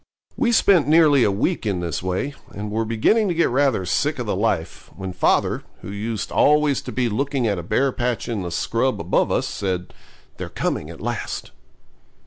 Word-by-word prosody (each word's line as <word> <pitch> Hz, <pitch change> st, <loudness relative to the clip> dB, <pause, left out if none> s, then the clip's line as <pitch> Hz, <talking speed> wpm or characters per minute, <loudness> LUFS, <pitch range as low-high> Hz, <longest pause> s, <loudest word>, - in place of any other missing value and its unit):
We 245 Hz, -4 st, +1 dB
spent 195 Hz, -9 st, +4 dB
nearly 150 Hz, -4 st, +5 dB
a -, -, +3 dB
week 105 Hz, -, 0 dB
in 100 Hz, -5 st, -1 dB
this 85 Hz, -4 st, -3 dB
way, 95 Hz, +10 st, -2 dB, 0.2 s
and 105 Hz, +1 st, -5 dB
were 110 Hz, +1 st, 0 dB
beginning 115 Hz, -, +2 dB
to 175 Hz, -, -1 dB
get 170 Hz, -, +2 dB
rather 130 Hz, -7 st, +2 dB
sick 145 Hz, -, 0 dB
of 125 Hz, -, -3 dB
the 105 Hz, -, -1 dB
life, 95 Hz, -5 st, -2 dB
when 95 Hz, -1 st, -6 dB
father, 90 Hz, -, +1 dB, 0.2 s
who -, -, -7 dB
used 105 Hz, +1 st, -4 dB
always 150 Hz, -2 st, +3 dB
to -, -, -7 dB
be 125 Hz, -2 st, 0 dB
looking 135 Hz, +3 st, -1 dB
at 100 Hz, -5 st, 0 dB
a -, -, -3 dB
bare 130 Hz, +10 st, +1 dB
patch 120 Hz, -1 st, -2 dB
in 115 Hz, -5 st, -2 dB
the 90 Hz, -, -4 dB
scrub 115 Hz, +9 st, 0 dB
above -, -, +1 dB
us, -, -, +1 dB
said 90 Hz, -2 st, -3 dB, 0.4 s
'They're -, -, -5 dB
coming 75 Hz, -, -2 dB
at 85 Hz, -, -10 dB
last.' 120 Hz, -1 st, -4 dB
115 Hz, 195 wpm, -22 LUFS, 95-140 Hz, 0.4 s, nearly